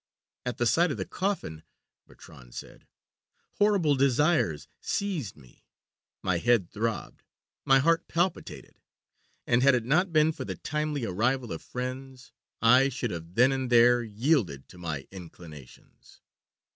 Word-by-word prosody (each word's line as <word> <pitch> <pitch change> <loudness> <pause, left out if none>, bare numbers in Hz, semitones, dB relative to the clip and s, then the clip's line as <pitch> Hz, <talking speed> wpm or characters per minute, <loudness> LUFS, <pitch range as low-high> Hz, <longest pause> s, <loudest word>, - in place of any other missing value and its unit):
"At 125 - -3
the 120 - 0
sight 170 +9 +3
of 140 - -3
the - - -3
coffin," 185 - -3 0.5
Bertrand - - -16
said, - - -10 0.7
"horrible 200 -8 +3
desires 135 - +1
seized 170 - -3
me; 65 -4 -20 0.6
my 90 -2 0
head 115 -4 +2
throbbed, 110 +1 -4 0.4
my 135 - +5
heart 165 +5 +2
palpitated, 175 +2 -3 0.7
and 120 +1 +2
had 135 0 +5
it 120 -2 -2
not 170 +8 +2
been 155 0 +4
for - - -7
the - - -5
timely 150 -3 -3
arrival 120 +6 -1
of 80 - -7
friends 130 0 -7 0.3
I 130 +4 +6
should 130 -2 -3
have 85 +1 -8
then 125 +3 +5
and 130 -2 -2
there 120 0 +5
yielded 110 - -1
to 90 - -14
my 75 -6 -5
inclinations. 80 -7 -14
125 Hz, 140 wpm, -27 LUFS, 95-150 Hz, 0.7 s, I